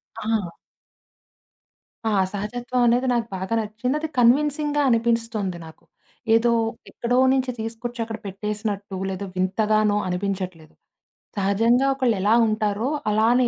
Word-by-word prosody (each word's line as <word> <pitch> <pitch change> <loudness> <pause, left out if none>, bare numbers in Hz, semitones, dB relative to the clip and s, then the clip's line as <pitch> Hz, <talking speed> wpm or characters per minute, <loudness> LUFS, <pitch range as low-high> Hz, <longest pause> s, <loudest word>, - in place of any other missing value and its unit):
ఆ! 210 -6 -2 1.5
ఆ! 220 - +2 0.2
సహజత్వం 240 +5 -2
అనేది 245 +2 +2
నాకు 235 -1 0
బాగా 190 +4 -3
నచ్చింది. 220 +5 -2
అది 315 - -3
కన్విన్సింగ్‌గా 290 +4 +3
అనిపిస్తుంది 230 -5 0
నాకు. 160 - -14 0.5
ఏదో 235 +1 +3 0.4
ఎక్కడో 245 +1 -1 0.2
నుంచి 260 -1 0
తీసుకొచ్చి 230 +2 -5
అక్కడ 225 -1 -5
పెట్టేసినట్టు 205 0 -4
లేదో 190 +1 -4
వింతగానో 210 +2 +2
అనిపించట్లేదు. 185 -3 -4 0.6
సహజంగా 225 +7 +3
ఒకళ్ళు 255 -5 +1
ఎలా 210 +3 +3
ఉంటారో 215 +2 0 0.2
అలానే 235 +4 +3
225 Hz, 110 wpm, -23 LUFS, 200-240 Hz, 1.5 s, కన్విన్సింగ్‌గా